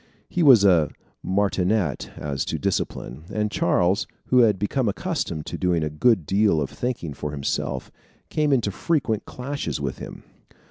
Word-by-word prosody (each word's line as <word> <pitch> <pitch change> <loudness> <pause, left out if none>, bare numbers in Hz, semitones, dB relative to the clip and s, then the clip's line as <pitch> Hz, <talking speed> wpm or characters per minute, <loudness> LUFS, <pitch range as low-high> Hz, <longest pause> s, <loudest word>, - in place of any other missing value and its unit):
He 175 - -2
was 130 -10 +7
a 85 -6 +5 0.3
martinet 95 - 0
as 70 -2 -2
to - - -2
discipline, 70 +6 -3
and 105 -1 -1
Charles, 90 +3 +2 0.2
who 125 - +5
had 110 -5 +5
become 105 +5 0
accustomed 100 - -3
to - - -5
doing 90 -3 +1
a 75 - -2
good 95 +2 +3
deal 100 -1 +3
of 70 -3 -2
thinking 120 - -3
for 75 - -5
himself, 70 -2 -3 0.4
came 150 -1 +1
into 120 -7 +2
frequent 120 - -1
clashes 140 - -4
with 70 -2 -4
him. - - -9
100 Hz, 155 wpm, -24 LUFS, 80-120 Hz, 0.4 s, was